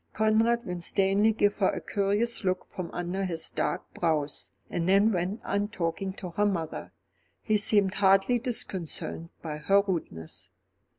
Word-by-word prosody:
Conrad 225 +2 +2
Winstanley 195 +4 +2
gave 205 -1 +1
her 190 - +4
a - - -2
curious 205 +4 0
look 185 -1 0
from 180 -3 -5
under 175 +2 -3
his 170 -4 -1
dark - - -1
brows, 155 -4 -1 0.2
and 175 +1 -1
then 200 +3 +5
went 185 +3 -1
on 200 +1 0
talking 190 -1 -2
to 180 -2 -7
her 205 +4 +1
mother. 165 -5 -3 0.5
He 215 -1 +1
seemed 205 -2 +3
hardly 195 +5 +4
disconcerted 190 - -4
by 155 -2 -4
her 195 +6 +3
rudeness. 120 - -4
195 Hz, 145 wpm, -28 LUFS, 175-210 Hz, 0.5 s, then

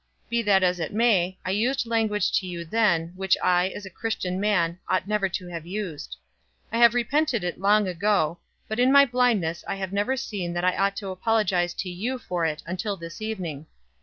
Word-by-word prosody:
Be 235 0 +2
that 200 -3 +3
as 180 -1 +2
it 165 +4 -4
may, 190 -6 +2
I 185 - -1
used 240 +6 +1
language 220 -4 +1
to 185 - -8
you 170 -1 -5
then, 175 -4 +1
which 190 -1 +2
I, 180 0 +3
as 200 - -8
a 190 - -9
Christian 185 -3 -3
man, 180 -4 +1
ought 185 +1 +1
never 210 -2 +1
to 180 0 -5
have 170 -1 -7
used. 175 - -5 0.5
I 230 - -1
have 235 0 +6
repented 245 - +1
it 175 -1 -3
long 205 +1 +3
ago, 180 -3 +1 0.3
but 220 +2 -3
in 255 +2 +4
my 280 0 +8
blindness 235 -10 +1
I - - -2
have 190 -1 -5
never 210 +7 0
seen 195 -9 -4
that 175 +1 -1
I 185 - +2
ought 200 0 +1
to 200 -1 -5
apologize 185 -3 0
to 185 - -4
you 225 +9 -3
for 180 -8 -2
it 155 -1 -4
until 195 +4 -3
this 165 +3 -9
evening. 175 -9 -5
195 Hz, 205 wpm, -25 LUFS, 175-220 Hz, 0.5 s, my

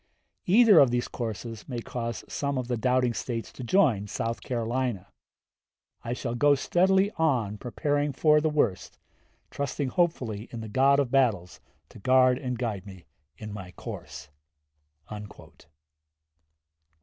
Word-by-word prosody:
Either 210 -1 +7
of 135 - +6
these 120 0 -1
courses 115 0 -6
may 120 -2 -3
cause 115 -1 -5
some 140 -1 -2
of 125 -2 -3
the 125 - -1
doubting 125 +1 +1
States 115 +2 -4
to 130 - -8
join 120 - +2
South 115 +3 -3
Carolina. 120 -4 -2 0.9
I 120 - -3
shall 120 -1 -4
go 145 +4 +4
steadily 190 +7 +2
on 120 -10 0
preparing 145 +4 -1
for 150 +3 +3
the 155 - +1
worst, 145 -11 -1 0.5
trusting 140 -1 -3
hopefully 125 - -1
in 115 - -6
the 110 - -6
God 135 +5 +4
of 135 -4 0
battles 115 -10 +1 0.3
to - - -14
guard 130 +3 +4
and 125 -3 -3
guide 105 -5 -4
me 95 -3 -12 0.3
in 105 -1 -8
my 95 -3 -8
course." 75 - -9
125 Hz, 135 wpm, -27 LUFS, 115-140 Hz, 0.9 s, Either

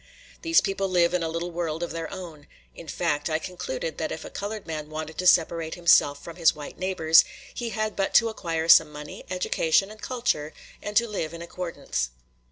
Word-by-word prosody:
These 330 0 +4
people 195 -1 -1
live 175 -1 +3
in 180 - +1
a 165 - -1
little 170 +2 -3
world 165 -1 -3
of 175 - -4
their 165 0 -5
own; 170 -6 -9 0.3
in 170 - -11
fact, 150 -1 -1
I 155 - +1
concluded - - -5
that - - -2
if - - -6
a - - -9
colored 210 +1 -5
man 155 -2 -5
wanted 155 0 -6
to 185 - +1
separate 165 -2 +3
himself 170 -5 +4
from 170 0 -9
his 165 -3 +4
white 150 -1 -9
neighbors, 170 -4 +5 0.3
he 240 -1 -4
had 215 0 -2
but 195 -1 -1
to 230 - +6
acquire 165 -7 -3
some 165 -2 +7
money, 150 0 -9
education, 185 +1 +1
and 215 - -13
culture, 230 -12 -1 0.3
and 210 0 -2
to 235 0 +4
live 170 -6 -4
in 170 - -7
accordance. 170 - -4
170 Hz, 200 wpm, -26 LUFS, 160-195 Hz, 0.3 s, some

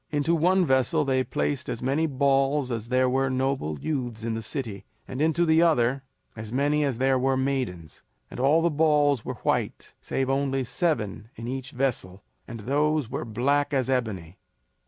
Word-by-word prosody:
Into 150 +2 0
one 180 +3 +3
vessel 130 +3 +2
they 130 -1 +1
placed 140 +1 -2
as 120 - -4
many 140 +5 +1
balls 135 -1 +1
as 115 -1 -4
there 130 0 +3
were 135 +1 +1
noble 130 - -1
youths 125 -7 -3
in 115 0 -2
the 110 - -3
city, 110 -4 -5 0.2
and 130 - -5
into 160 +2 +2
the 160 0 +4
other 135 -6 +2 0.3
as 110 -1 -8
many 145 +4 +1
as 135 -5 -1
there 130 +1 +2
were 135 +1 +1
maidens; 130 - -3 0.3
and - - -8
all 145 +6 +3
the 170 - +2
balls 145 -4 +2
were - - -5
white - - -1
save 135 -1 -2
only 135 0 0
seven 115 - -2
in 115 - -7
each 130 0 -4
vessel, 120 -8 -3 0.2
and 115 -1 -7
those 145 +2 0
were - - -3
black 140 +6 0
as 130 -1 0
ebony. 100 -9 -3
135 Hz, 175 wpm, -26 LUFS, 120-145 Hz, 0.3 s, the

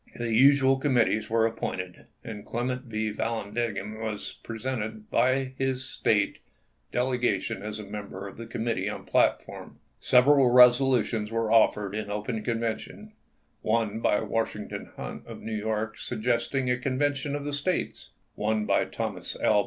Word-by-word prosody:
The 120 -1 -2
usual 135 +2 +6
committees 120 -5 +2
were 115 0 +3
appointed, 90 -5 -4 0.2
and 105 -3 -7
Clem 120 +2 -2
ent 125 +1 -5
L. 110 -1 -1
Vallandigham 110 -1 -3
was 110 -2 -4
presented 110 -2 -5
by 130 +2 +2
his 130 -1 0
State 110 -5 +1 0.5
delegation 125 -7 0
as 105 +1 -5
a 105 - -7
member 100 -1 -7
of 95 - -10
the 115 0 -7
committee 110 -4 -2
on - - -6
plat - - +3
form. - - -11 0.2
Several 130 +1 +5
resolutions 125 -3 +5
were 115 -1 0
offered 105 -3 +3
in 105 -1 -4
open 105 +2 -3
convention 115 - -3 0.2
— - - -43
one 110 -1 0
by 105 - +2
Washington 110 -1 -3
Hunt - - -7
of - - -8
New 110 - -5
York 110 +1 -2
suggesting 120 +3 -1
a 125 - 0
convention 140 +2 0
of 145 0 -4
the 145 - -3
States; 160 +6 -2 0.2
one 110 0 0
by - - +2
Thomas - - -4
L. 105 - +4
115 Hz, 155 wpm, -27 LUFS, 105-130 Hz, 0.5 s, usual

